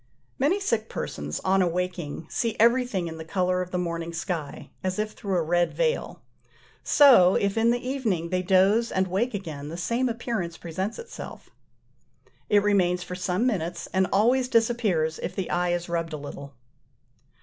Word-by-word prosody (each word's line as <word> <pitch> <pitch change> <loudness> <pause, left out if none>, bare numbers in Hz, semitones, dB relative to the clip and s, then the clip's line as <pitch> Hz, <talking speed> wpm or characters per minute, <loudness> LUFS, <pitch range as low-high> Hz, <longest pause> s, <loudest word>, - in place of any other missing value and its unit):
Many 305 +10 +2
sick 230 - -1
persons, 75 0 -4
on 190 0 +2
awaking, 175 -3 -2
see 230 +4 -2
everything 235 -5 +3
in 160 0 -7
the - - -5
colour 180 +2 0
of 180 - -4
the 180 - -2
morning 170 -1 -3
sky, 165 -3 -5
as 185 0 -1
if 215 0 -1
through 195 -3 -2
a 170 - +1
red 175 +2 +1
veil: - - -1 0.6
so, 245 -11 +7
if 200 -1 +1
in 225 +1 +3
the 245 +1 0
evening 215 -11 -1
they 185 +1 0
doze 195 +5 +3
and 190 0 +1
wake 205 +6 -1
again, 155 -7 -6
the 165 - -6
same 235 +8 0
appearance 225 -8 -3
presents 185 +6 -4
itself. 470 0 -9 1.0
It 205 -1 +4
remains 180 -3 +2
for 180 - -7
some 180 +4 -1
minutes, 175 -8 -1
and 190 0 +2
always 250 +5 +3
disappears 220 -10 +1
if - - -4
the 190 - -3
eye 175 0 +1
is 175 0 -1
rubbed 165 -1 -2
a - - -3
little. 140 -1 -9
185 Hz, 170 wpm, -26 LUFS, 170-230 Hz, 1.0 s, so